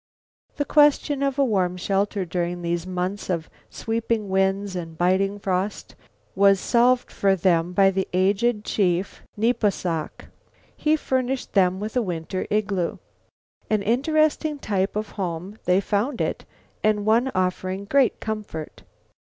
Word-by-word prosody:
The 290 - -1
question 290 -1 +3
of 275 -1 0
a 280 - +4
warm 185 -6 0
shelter 195 +1 -1
during 175 0 -3
these 170 +1 -2
months 185 +2 -3
of 170 -3 -2 0.2
sweeping 225 -2 -2
winds 195 +1 0
and 165 -2 -6
biting 190 +3 +1
frost 195 0 -2 0.4
was 195 0 +4
solved 245 +3 +2
for 195 -1 +2
them 175 -2 +2
by 195 +1 +4
the 190 0 -1
aged 205 +4 +1
chief 185 -1 0 0.2
Nepos 225 -2 +2
sok. 165 -4 -4 0.5
He 305 0 +2
furnished 260 -3 -2
them 185 -2 +3
with 215 +3 -5
a 250 - +3
winter 180 -2 -4
igloo. 200 -4 -1 0.7
An 215 -2 +1
interesting 305 +6 +1
type 200 -7 -1
of 210 0 -2
home 180 +4 -4
they 180 +1 +4
found 215 +6 -1
it - - -2 0.4
and 210 -1 +2
one 235 +5 +3
offering 185 +1 -1
great 270 +3 +2
comfort. 210 -8 -6
200 Hz, 140 wpm, -24 LUFS, 185-230 Hz, 0.7 s, a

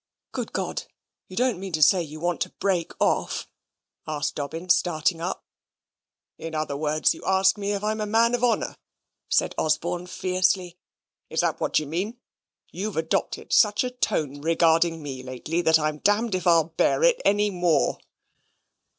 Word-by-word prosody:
"Good - - -4
God, - - -3 0.4
you 185 - -11
don't 245 -6 +1
mean 190 -2 -7
to 155 -1 +3
say 180 +6 +5
you 155 -1 -7
want 175 +1 -1
to - - 0
break 185 -4 -1
off?" - - 0 0.6
asked 145 -2 -2
Dobbin, 165 +5 -5
starting 165 -1 +2
up. 180 +2 -4 0.9
"In 165 -1 -6
other 155 -2 -2
words, 155 +1 +1
you - - -12
ask 190 0 +3
me 205 0 -2
if 200 0 -3
I'm 215 +1 -1
a 210 - -2
man 230 +3 +3
of 245 0 0
honour," 240 -2 +1 0.5
said - - +2
Osborne, 175 +3 -1
fiercely; 185 -1 0 0.5
"is - - 0
that - - -1
what - - 0
you 155 - +1
mean? 185 - -3 0.5
You've 200 +1 -4
adopted 160 0 -2
such 210 +2 +4
a 250 - -3
tone 145 - -2
regarding 165 0 +2
me 135 -3 -6
lately 130 +7 -3
that 160 -2 +5
I'm 155 -1 -2
if 205 -3 +1
I'll 165 -2 +4
bear 165 - +1
it - - +4
any 205 0 +2
more." 175 -3 +1
175 Hz, 165 wpm, -25 LUFS, 155-200 Hz, 0.9 s, say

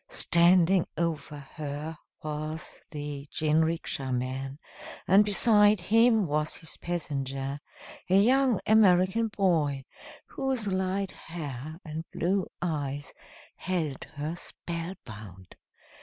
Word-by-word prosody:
Standing 175 +1 +5
over 160 -2 -2
her 145 +2 -6 0.3
was 155 +1 -5
the 145 -1 -6
jinrikisha 155 -3 0
man, 130 +2 -3 0.5
and 195 +3 +7
beside 210 0 +5
him 225 +3 +4
was 150 0 -1
his 160 - -5
passenger, 140 -5 -3 0.5
a 185 - +4
young 250 +3 +4
American 205 0 +4
boy, 160 -10 +1 0.4
whose 265 -5 -2
light 190 0 -1
hair 155 -2 -7
and 155 +1 -5
blue 190 +2 0 0.2
eyes 145 -4 -3 0.4
held 165 -7 -2
her 150 +3 -3
spell 170 +1 -6
bound. 100 -5 -11
165 Hz, 100 wpm, -28 LUFS, 145-190 Hz, 0.5 s, and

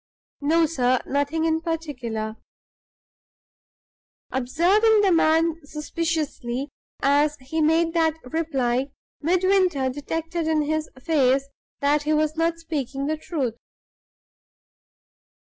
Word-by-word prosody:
"No, 325 +3 +3
sir; 255 -5 +1
nothing 285 +3 0
in 320 0 +1
particular." 250 -10 -4 1.9
Observing 370 - +3
the 395 -2 +3
man 330 0 +3
suspiciously 300 -4 -3 0.3
as 290 +2 +3
he 280 +5 -3
made 325 +2 +3
that 325 -2 +2
reply, 265 -3 -1 0.3
Midwinter 360 -5 +2
detected 325 +4 -3
in 310 -1 +2
his 310 +1 -1
face 275 -2 +2 0.3
that 290 +1 +3
he 300 +1 0
was 310 0 +1
not 330 +1 +1
speaking 275 -5 -4
the 310 +2 0
truth. 285 -7 -2
310 Hz, 100 wpm, -24 LUFS, 275-330 Hz, 1.9 s, No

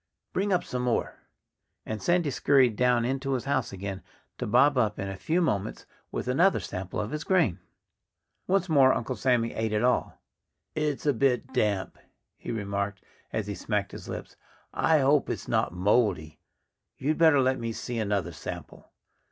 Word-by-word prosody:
"Bring 200 +2 0
up 180 - +2
some 125 - -4
more!" 125 -2 -1 0.7
And 110 -1 -4
Sandy 175 -4 +2
scurried 130 -5 +3
down 125 0 +2
into 135 +2 -1
his 125 -1 -2
house 135 -3 0
again, 95 0 -5 0.4
to - - -2
bob 140 +6 +4
up 110 -4 +1
in 100 - -3
a 95 - -5
few 165 - 0
moments 105 -8 -2 0.3
with - - -4
another 170 +10 +3
sample 95 0 -5
of 105 +3 -3
his 150 +1 -3
grain. 165 - +2 0.9
Once 190 -1 +2
more 140 -5 +5
Uncle 120 - -3
Sammy 120 -3 +1
ate 110 -1 -2
it 105 +2 +1
all. 125 0 +1 0.5
"It's 150 -2 -2
a 145 - +3
bit 130 +1 0
damp," 105 -6 0 0.4
he - - -10
remarked, 100 -2 -3 0.3
as 110 - -2
he 100 - -4
smacked 100 +1 -2
his - - -9
lips. - - -7 0.4
"I 160 -2 +3
hope 140 +2 +3
it's - - -4
not 70 - +1
moldy.... 90 -4 +1 0.6
You'd 150 +5 -1
better 160 -4 +6
let 130 0 +2
me 115 -1 -3
see 115 +1 -4
another 100 -5 -1
sample." - - -8
125 Hz, 170 wpm, -27 LUFS, 105-140 Hz, 0.9 s, better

